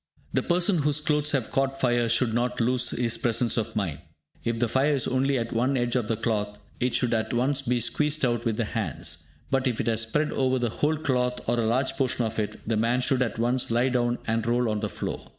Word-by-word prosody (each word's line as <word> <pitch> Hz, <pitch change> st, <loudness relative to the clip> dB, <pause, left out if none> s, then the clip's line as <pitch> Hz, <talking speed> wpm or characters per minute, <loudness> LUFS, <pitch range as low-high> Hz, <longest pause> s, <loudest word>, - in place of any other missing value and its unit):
The -, -, +2 dB
person 175 Hz, +1 st, +2 dB
whose 150 Hz, 0 st, +1 dB
clothes 150 Hz, -1 st, +1 dB
have 130 Hz, -5 st, -1 dB
caught 135 Hz, 0 st, 0 dB
fire 120 Hz, -2 st, +2 dB
should 120 Hz, 0 st, +1 dB
not 125 Hz, +1 st, 0 dB
lose 125 Hz, +1 st, +3 dB
his 115 Hz, -1 st, 0 dB
presence 120 Hz, 0 st, +1 dB
of 115 Hz, -1 st, -2 dB
mind. 95 Hz, -9 st, -2 dB, 0.4 s
If 115 Hz, 0 st, -1 dB
the 120 Hz, +1 st, +1 dB
fire 140 Hz, +5 st, +2 dB
is 130 Hz, -, 0 dB
only 135 Hz, +1 st, +1 dB
at 115 Hz, -1 st, -3 dB
one 125 Hz, +4 st, +1 dB
edge 120 Hz, 0 st, 0 dB
of 120 Hz, -4 st, 0 dB
the 115 Hz, -, -1 dB
cloth, 105 Hz, -2 st, -2 dB, 0.2 s
it 125 Hz, 0 st, 0 dB
should 120 Hz, -2 st, +1 dB
at 110 Hz, 0 st, -1 dB
once 135 Hz, +3 st, +1 dB
be 125 Hz, -2 st, 0 dB
squeezed 150 Hz, +6 st, +1 dB
out 120 Hz, -2 st, 0 dB
with 115 Hz, -2 st, -1 dB
the 115 Hz, -, 0 dB
hands; 105 Hz, -, -4 dB, 0.3 s
but 135 Hz, 0 st, +2 dB
if 120 Hz, -3 st, -1 dB
it -, -, -1 dB
has 115 Hz, -1 st, +1 dB
spread 150 Hz, +7 st, 0 dB
over 130 Hz, -1 st, +1 dB
the 120 Hz, -2 st, 0 dB
whole 150 Hz, +6 st, 0 dB
cloth 125 Hz, -4 st, -1 dB
or 120 Hz, +1 st, +1 dB
a 115 Hz, -, +1 dB
large 130 Hz, +4 st, +1 dB
portion 130 Hz, -3 st, +1 dB
of 110 Hz, 0 st, -3 dB
it, 105 Hz, -, -3 dB
the 115 Hz, -1 st, +1 dB
man 120 Hz, +3 st, +1 dB
should 130 Hz, 0 st, +1 dB
at 120 Hz, -3 st, -1 dB
once 120 Hz, +2 st, 0 dB
lie 120 Hz, +3 st, +2 dB
down 120 Hz, -1 st, +1 dB
and 115 Hz, 0 st, -1 dB
roll 120 Hz, 0 st, +2 dB
on 105 Hz, -1 st, -1 dB
the 105 Hz, 0 st, -2 dB
floor. -, -, -5 dB
120 Hz, 240 wpm, -26 LUFS, 115-130 Hz, 0.4 s, lose